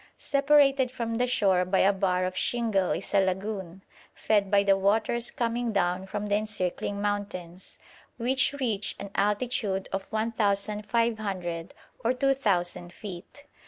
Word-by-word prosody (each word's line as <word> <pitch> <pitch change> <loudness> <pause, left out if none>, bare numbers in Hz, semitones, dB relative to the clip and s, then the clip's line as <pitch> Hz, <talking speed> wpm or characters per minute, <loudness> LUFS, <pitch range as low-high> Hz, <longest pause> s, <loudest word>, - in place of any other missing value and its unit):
Separated 280 -2 +3
from 230 -2 -3
the 250 - +2
shore 195 -7 +3
by 185 +2 0
a 195 +2 +4
bar 185 -2 +1
of 185 0 -3
shingle 220 -5 +1
is 195 - -3
a 200 - +5
lagoon, 190 -1 -3 0.3
fed 205 -3 +1
by 200 0 +4
the 200 -1 +4
waters 220 +4 +1
coming 235 0 -1
down 185 -1 0
from 205 +1 -4
the 205 - -1
encircling 205 -2 -2
mountains, 200 -4 -4 0.4
which 255 +3 +1
reach 230 -8 -1
an 200 -1 -8
altitude 205 -2 0
of 195 0 -3
1,500 210 -4 -1 0.3
or 235 +2 +2
2,000 205 -11 0
feet. 195 +8 -10
205 Hz, 135 wpm, -27 LUFS, 190-230 Hz, 0.4 s, a